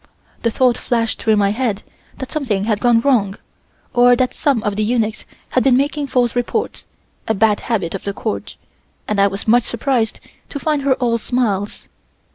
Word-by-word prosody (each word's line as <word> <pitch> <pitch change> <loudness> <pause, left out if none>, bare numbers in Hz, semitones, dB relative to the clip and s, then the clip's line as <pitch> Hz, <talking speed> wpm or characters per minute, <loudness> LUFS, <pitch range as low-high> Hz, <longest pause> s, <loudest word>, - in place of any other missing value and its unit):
The 230 - +1
thought 245 +1 +2
flashed 230 -2 -1
through 220 -1 +3
my 200 -1 +2
head 220 -3 -2 0.3
that 265 - -7
something 240 -11 -1
had 210 -1 0
gone 240 -1 +3
wrong, 220 -7 +1 0.6
or 245 0 +6
that 255 +1 0
some 275 -8 0
of 205 -1 -1
the 215 - 0
eunuchs 220 -1 -1 0.2
had 255 - +1
been 260 -2 +4
making 285 +1 -1
false 245 -3 +1
reports, 245 - -2 0.4
a 220 - +1
bad 210 +1 +3
habit 195 -8 -2
of 195 - -5
the 200 - -2
Court; 215 +2 -4 0.5
and 210 -2 +1
I 200 - +5
was 195 +2 -5
much 240 +3 +5
surprised 235 -1 -1 0.3
to - - -5
find 300 -1 0
her 270 -1 +2
all 235 -2 0
smiles. 210 -5 -2
235 Hz, 185 wpm, -18 LUFS, 210-255 Hz, 0.6 s, or